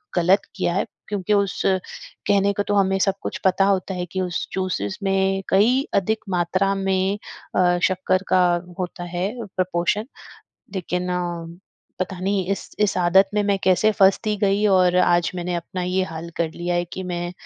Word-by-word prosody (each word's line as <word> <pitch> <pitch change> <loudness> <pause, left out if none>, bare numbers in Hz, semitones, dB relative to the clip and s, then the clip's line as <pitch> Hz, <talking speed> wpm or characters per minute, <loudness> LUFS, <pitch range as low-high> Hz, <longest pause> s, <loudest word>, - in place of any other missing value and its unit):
गलत 180 +3 +4
किया 185 -3 0
है 195 - 0 0.2
क्योंकि 205 -1 -1
उस 200 -1 +1
कहने 195 +1 0
को 205 - -1
तो 205 - -2
हमें 195 -1 +3
सब 195 0 +2
कुछ - - -4
पता 190 +1 +4
होता 195 -1 +1
है 180 -1 -3
कि 190 - -2
उस 180 -1 -2
जूसेस 190 +1 -2
में 195 0 +1
कई 240 +8 +4
अधिक 215 +3 +1
मात्रा 185 +2 +1
में 195 0 0 0.4
अ, 175 -1 +3
शक्कर 185 0 +1
का 185 -1 +4 0.4
होता 180 -1 -4
है 180 +2 0 0.3
प्रपोर्शन 185 +3 0 0.7
लेकिन 180 -1 -2 0.9
पता 185 0 -3
नहीं 190 -1 0
इस 195 - -6
इस 210 -2 +2
आदत 185 +2 +4
में 210 - +2
मैं 200 -1 +1
कैसे 190 +3 +4
फँसती 200 +2 +3
गई 200 +1 +1
और 185 -3 +4
आज 175 -1 +3
मैंने 180 0 -3
अपना 175 +2 -4
ये 180 +1 0
हाल 165 -1 -7
कर 165 -1 0
लिया 175 0 -2
है 175 0 +1
कि 190 - -4
मैं 175 -1 -4
190 Hz, 170 wpm, -22 LUFS, 180-195 Hz, 0.9 s, गलत